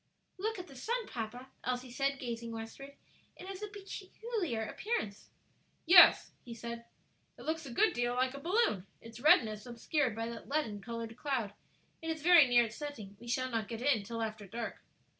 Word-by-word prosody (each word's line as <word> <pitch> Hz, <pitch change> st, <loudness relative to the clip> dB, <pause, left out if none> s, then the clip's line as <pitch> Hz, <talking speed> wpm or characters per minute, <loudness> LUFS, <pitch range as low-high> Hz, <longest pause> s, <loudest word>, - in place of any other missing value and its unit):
"Look 440 Hz, +3 st, -1 dB
at 365 Hz, -, -6 dB
the 275 Hz, -, -13 dB
sun, 465 Hz, -, -2 dB
papa," 245 Hz, +3 st, -6 dB
Elsie 250 Hz, 0 st, -2 dB
said, 275 Hz, +2 st, 0 dB
gazing 235 Hz, -2 st, -5 dB
westward. 230 Hz, +5 st, -8 dB, 0.4 s
"It 360 Hz, -, -10 dB
has 385 Hz, 0 st, -7 dB
a 420 Hz, -, -3 dB
very 405 Hz, -1 st, -11 dB
peculiar 385 Hz, -, -3 dB
appearance." 220 Hz, -, -3 dB, 0.6 s
"Yes," 350 Hz, +1 st, +8 dB
he 235 Hz, -2 st, -8 dB
said, 235 Hz, 0 st, -6 dB, 0.5 s
"it -, -, -11 dB
looks 315 Hz, -1 st, -2 dB
a -, -, -7 dB
good 405 Hz, -, +3 dB
deal 240 Hz, 0 st, 0 dB
like 255 Hz, +1 st, +1 dB
a 280 Hz, -, -7 dB
balloon; 340 Hz, -, +1 dB
it's 230 Hz, 0 st, -11 dB
redness 220 Hz, -6 st, +4 dB
obscured 245 Hz, +1 st, 0 dB
by 225 Hz, 0 st, -2 dB
that 235 Hz, +1 st, -8 dB
leaden 250 Hz, -9 st, -1 dB
colored 230 Hz, +1 st, -5 dB
cloud. 250 Hz, -7 st, -2 dB, 0.5 s
It 325 Hz, -, -4 dB
is 320 Hz, -2 st, -3 dB
very 340 Hz, -5 st, +8 dB
near 240 Hz, -1 st, +5 dB
its 220 Hz, 0 st, -8 dB
setting; 245 Hz, -10 st, -7 dB
we 240 Hz, -, -12 dB
shall 255 Hz, +2 st, 0 dB
not 225 Hz, -3 st, -1 dB
get 230 Hz, +2 st, -5 dB
in 260 Hz, -6 st, +3 dB
till 230 Hz, +3 st, -4 dB
after 215 Hz, -2 st, -5 dB
dark." 230 Hz, +4 st, -5 dB
250 Hz, 190 wpm, -33 LUFS, 230-315 Hz, 0.6 s, Yes